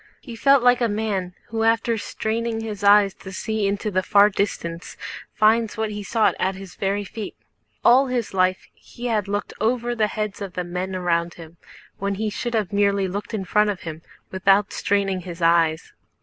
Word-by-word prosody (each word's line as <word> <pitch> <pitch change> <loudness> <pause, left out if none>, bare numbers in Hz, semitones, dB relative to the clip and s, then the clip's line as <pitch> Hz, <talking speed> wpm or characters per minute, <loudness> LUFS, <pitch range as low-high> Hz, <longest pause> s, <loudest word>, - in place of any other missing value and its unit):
He 240 -4 -9
felt 275 +2 +4
like 245 0 +4
a 235 - +3
man 205 -4 -2
who 225 0 -2
after 230 +1 +2
straining 225 +1 -3
his 210 -2 -6
eyes 200 -1 +6
to 190 - -11
see 215 +1 -1
into 205 +2 -2
the 185 -1 +1
far 205 +2 +5
distance 170 -4 -3 0.3
finds 220 0 +2
what 220 -1 -1
he 205 0 -5
sought 220 +2 +2
at 190 0 0
his 190 -1 -10
very 200 +1 -1
feet. 210 0 -7 0.5
All 260 +3 +6
his 245 -5 -2
life 185 0 +1
he 245 - -11
had 215 -4 0
looked 205 +1 -3
over 240 +2 0
the 220 -3 +1
heads 210 -1 -4
of 195 -3 -5
the 180 - -2
men 180 +2 -4
around 170 -1 0
him, 165 0 -12 0.4
when 200 0 -1
he 215 +1 -2
should 240 +2 -3
have 210 -2 -1
merely 200 -1 +2
looked 205 +4 -4
in 195 -3 -3
front 210 +3 +3
of 200 -3 -3
him 160 -1 -7 0.3
without 195 +2 +3
straining 195 -2 0
his 175 -1 -8
eyes. 165 -1 +2
205 Hz, 190 wpm, -23 LUFS, 185-220 Hz, 0.5 s, eyes